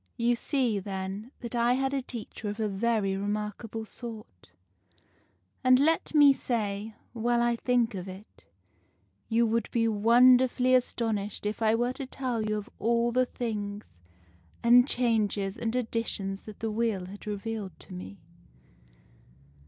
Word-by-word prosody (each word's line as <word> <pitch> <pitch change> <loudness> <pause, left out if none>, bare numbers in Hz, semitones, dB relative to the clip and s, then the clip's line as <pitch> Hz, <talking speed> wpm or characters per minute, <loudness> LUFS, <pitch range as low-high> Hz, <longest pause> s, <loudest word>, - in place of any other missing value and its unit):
You 240 0 +2
see, 240 -4 0
then, 195 +3 -5
that 235 -1 -3
I 240 0 +3
had 270 +1 0
a 275 - 0
teacher 230 -4 -7
of 205 +2 -6
a 215 - +1
very 205 -1 0
remarkable 210 +2 -4
sort. 215 - -10 1.1
And 255 0 +6
let 320 +3 +2
me 290 -2 +8
say, 215 -4 -2 0.2
while 240 +1 +1
I 240 0 +2
think 240 -1 +1
of 185 -1 -6
it, 185 - -12 0.8
you 230 +1 +3
would 230 +1 0
be 230 -1 +1
wonderfully 250 +4 +5
astonished 225 -5 0
if 210 +2 -3
I 220 0 +4
were 240 +2 0
to 265 0 -6
tell 255 -4 -2
you 215 0 -1
of 210 - -6
all 235 +1 +2
the 255 +1 +2
things 210 -4 -4 0.8
and 245 +2 +7
changes 215 -6 0
and 230 0 -3
additions 220 -5 -2
that 215 -2 -11
the 225 -1 -1
Wheel 215 -4 -1
has 200 +3 -11
revealed 210 -2 -5
to - - -12
me. 95 +2 -8
225 Hz, 145 wpm, -28 LUFS, 205-240 Hz, 1.1 s, me